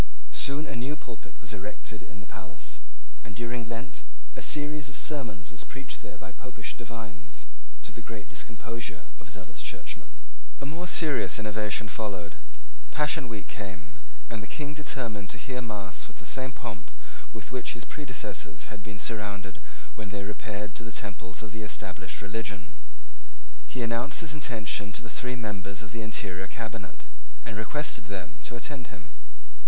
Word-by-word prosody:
Soon 145 +2 +6
a 140 - -1
new 130 +5 +3
pulpit 125 -6 -7
was 105 0 -2
erected 105 +2 -3
in 105 - -7
the - - -8
palace; 95 -1 -4 0.4
and, 110 -3 -5
during 120 0 +2
Lent, 115 +3 -1 0.3
a - - -2
series 150 -1 +4
of 135 - +2
sermons 110 - +3
was 105 - 0
preached 135 +9 -2
there - - -5
by 95 +1 -6
Popish 120 -4 -2
divines, 110 -10 -4 0.4
to - - -2
the 115 - -4
great 110 -1 -4
discomposure 105 -1 -1 0.2
of 105 - -6
zealous 95 -2 -2
churchmen. - - -1 0.4
A 140 - -1
more 165 +5 0
serious 155 -5 +6
innovation 105 -1 +3
followed. 100 -6 0 0.5
Passion 150 -2 +6
week 105 -3 -1
came; 95 -3 -3 0.3
and 110 - -1
the 105 - -3
King 145 +6 0
determined 115 -9 0
to 115 - 0
hear 125 +4 0
mass 105 -5 0
with - - -12
the - - -7
same 130 0 +3
pomp - - -3 0.4
with 110 -1 -5
which 130 - +3
his 115 - -3
predecessors 110 - -1
had 105 - -4
been 100 0 -4
surrounded 100 -3 +1 0.3
when 110 -1 -2
they 100 0 +1
repaired 105 0 -1
to 115 - -3
the 115 - -3
temples 95 -1 -2
of 105 - -5
the 110 - -1
established 105 -1 0
religion. 100 -3 0 1.0
He 125 - +2
announced 115 +7 +4
his 155 - +3
intention 110 -8 +3
to 120 - -3
the 115 - -3
three 125 0 +1
members 100 -2 0
of 105 - -7
the 115 - +1
interior 95 -4 +1
cabinet, 110 -5 -3 0.4
and - - -1
requested 120 +2 +2
them 95 -3 -2
to 120 - -2
attend 125 0 -1
him. 90 -3 -8
110 Hz, 170 wpm, -34 LUFS, 100-120 Hz, 1.0 s, Soon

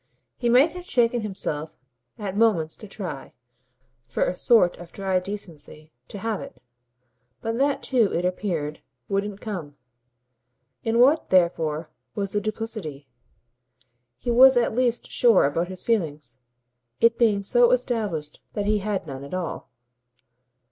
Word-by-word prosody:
He 240 - -1
might 260 +7 +5
have 360 +1 -9
shaken 240 -1 +2
himself 160 -7 -4 0.4
at 200 -3 -5
moments 200 -8 +2
to 215 - -10
try, 180 -9 -7 0.7
for 115 - 0
a 180 - -2
sort 200 -4 +4
of 175 -1 -11
dry 190 -2 0
decency, 170 -6 -8 0.2
to - - -8
have 215 +1 -2
it; - - -10 0.8
but 225 +1 -3
that 280 0 +1
too, 235 -6 +2
it 175 - -1
appeared, 175 -5 -2 0.3
wouldn't 200 0 -2
come. 175 -10 -6 1.1
In 225 0 +1
what 275 +6 +4
therefore 165 -4 +1 0.2
was 200 -2 -2
the 205 - +1
duplicity? 210 -10 -5 1.1
He 240 - -2
was 260 +2 +7
at 235 - +2
least 240 0 0
sure 235 -6 +5
about 165 +5 0
his 185 0 -7
feelings 150 - -2 0.6
it 230 0 +4
being 215 -4 +2
so 240 +4 +4
established 215 - -1
that 205 - -2
he 210 0 +2
had 195 -2 -2
none 135 -2 -7
at 140 +6 -6
all. 180 -3 -4
200 Hz, 140 wpm, -24 LUFS, 165-230 Hz, 1.1 s, was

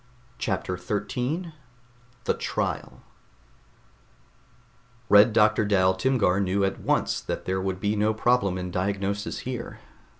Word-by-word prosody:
CHAPTER 90 -2 -2
13 125 - -3 0.7
THE - - +1
TRIAL - - -3 2.1
Red 105 +3 +7
Doctor 105 0 +4
Dal 95 -3 +3
Timgar 100 -3 +1
knew 100 0 +1
at 95 - -2
once - - 0
that - - -5
there 95 0 -1
would 95 -1 -2
be 105 +2 0
no 105 +1 +2
problem 110 -4 +1
in 90 0 -4
diagnosis 100 +3 -2
here. 130 -1 -6
100 Hz, 120 wpm, -26 LUFS, 95-110 Hz, 2.1 s, Red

